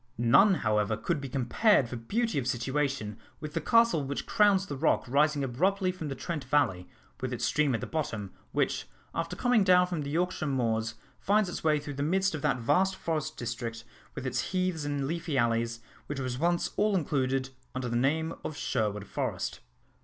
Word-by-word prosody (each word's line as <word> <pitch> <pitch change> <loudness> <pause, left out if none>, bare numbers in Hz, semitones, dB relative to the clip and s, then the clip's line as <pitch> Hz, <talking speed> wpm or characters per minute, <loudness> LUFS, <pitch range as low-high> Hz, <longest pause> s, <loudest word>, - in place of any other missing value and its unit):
None, 120 - +5
however, 105 0 +2
could 165 +1 -1
be 135 - -5
compared 135 - +3
for 120 - -6
beauty 200 - -1
of 125 - -3
situation 130 -3 -1 0.2
with 155 -1 -7
the - - -1
castle 230 -10 +4
which 140 +1 -3
crowns 200 -2 +4
the 145 - -5
rock 150 +4 +2
rising 145 +2 +2
abruptly 185 +9 +1
from 170 -4 -6
the 135 - -4
Trent 160 +1 -4
valley, 130 -11 +1 0.3
with 130 -1 -2
its 120 -1 -1
stream 145 0 +2
at 115 - -3
the - - -3
bottom, 110 - -3 0.2
which, - - 0 0.3
after 165 0 -3
coming 245 -4 +3
down 180 -1 +6
from 175 -3 -3
the 140 - -4
Yorkshire 170 0 -1
moors, 115 -4 0 0.2
finds 205 -1 +2
its - - -5
way 155 -1 +3
through 145 0 -6
the 140 - -4
midst 190 +5 +1
of 155 - -4
that - - +1
vast 180 +11 +2
forest 160 -5 -3
district, 115 -1 -4 0.3
with - - -5
its 130 - -2
heaths 185 -4 0
and 145 -1 -1
leafy 165 -1 -2
alleys, 115 -1 +1 0.3
which 145 -2 -4
was 130 -1 -3
once 170 +2 +1
all 210 0 +3
included 135 -5 0 0.2
under 130 -1 -2
the 120 - -2
name 160 +6 +1
of 150 - -5
Sherwood 105 -5 -1
Forest. - - -3
145 Hz, 190 wpm, -29 LUFS, 120-170 Hz, 0.3 s, down